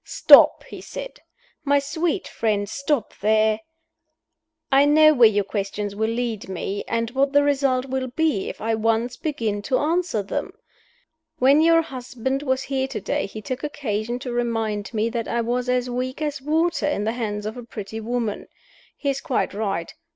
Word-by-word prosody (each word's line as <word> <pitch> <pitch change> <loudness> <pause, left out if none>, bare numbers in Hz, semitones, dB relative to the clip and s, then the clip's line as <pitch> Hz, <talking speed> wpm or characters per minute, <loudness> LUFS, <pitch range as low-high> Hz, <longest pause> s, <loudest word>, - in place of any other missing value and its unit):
"Stop!" - - +6
he - - -10
said. - - -8 0.4
"My 285 -1 +3
sweet 320 +6 -1
friend, 210 -2 -1
stop 280 0 -2
there! 215 +1 +3 1.1
I 270 +1 +6
know 310 +1 +6
where 240 -5 +7
your 205 -1 +1
questions 200 0 -4
will 220 +1 0
lead 230 -4 -3
me, 195 +2 -4
and 230 0 -1
what 275 +2 +1
the 285 0 +5
result 270 -3 +1
will 260 -1 -2
be 265 -5 0
if - - -8
I 225 +1 0
once 225 +2 0
begin 225 -10 -2
to 255 +5 0
answer 325 - 0
them. 195 - -4 0.8
When 275 +3 +5
your 330 0 +5
husband 265 -1 -4
was 260 -2 -1
here 265 -1 -1
to - - -5
day 290 - -2
he 215 +2 -9
took 260 +3 -5
occasion 240 -5 -3
to 245 - -3
remind 225 -3 -2
me 220 -1 0
that 230 -1 -3
I 235 0 0
was 245 +2 -1
as 250 0 +1
weak 255 +2 -3
as 295 -2 -3
water 320 +2 +1
in 295 -8 -1
the 220 - 0
hands 210 -3 -3
of 215 - -4
a 245 - -7
pretty 220 -2 -7
woman. 225 -1 -3 0.5
He 280 - 0
is 275 - -4
quite 255 - -1
right. 195 -5 -3
245 Hz, 180 wpm, -23 LUFS, 220-280 Hz, 1.1 s, where